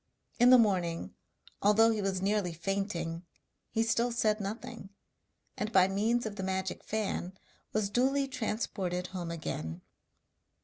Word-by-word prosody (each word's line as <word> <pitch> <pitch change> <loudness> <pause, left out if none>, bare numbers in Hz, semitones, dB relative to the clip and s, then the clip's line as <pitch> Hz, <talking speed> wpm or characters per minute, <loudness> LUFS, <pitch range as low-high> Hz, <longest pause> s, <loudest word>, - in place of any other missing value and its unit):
In 245 +1 +7
the 255 - +9
morning, 180 -7 +1 0.5
although 220 +3 +5
he 215 -2 -1
was 190 -1 -1
nearly 200 -3 +1
fainting, 170 -1 -2 0.5
he 225 - +1
still 230 +1 +1
said 220 -2 +1
nothing, 220 0 -6 0.7
and 210 +1 -3
by 190 -3 +6
means 220 +5 +1
of 210 -1 -5
the - - -3
magic 190 0 -2
fan 195 -3 -3 0.3
was 210 -2 0
duly 270 +4 +2
transported 205 -7 -2
home 175 -2 -4
again. 85 - -4
200 Hz, 135 wpm, -31 LUFS, 185-225 Hz, 0.7 s, the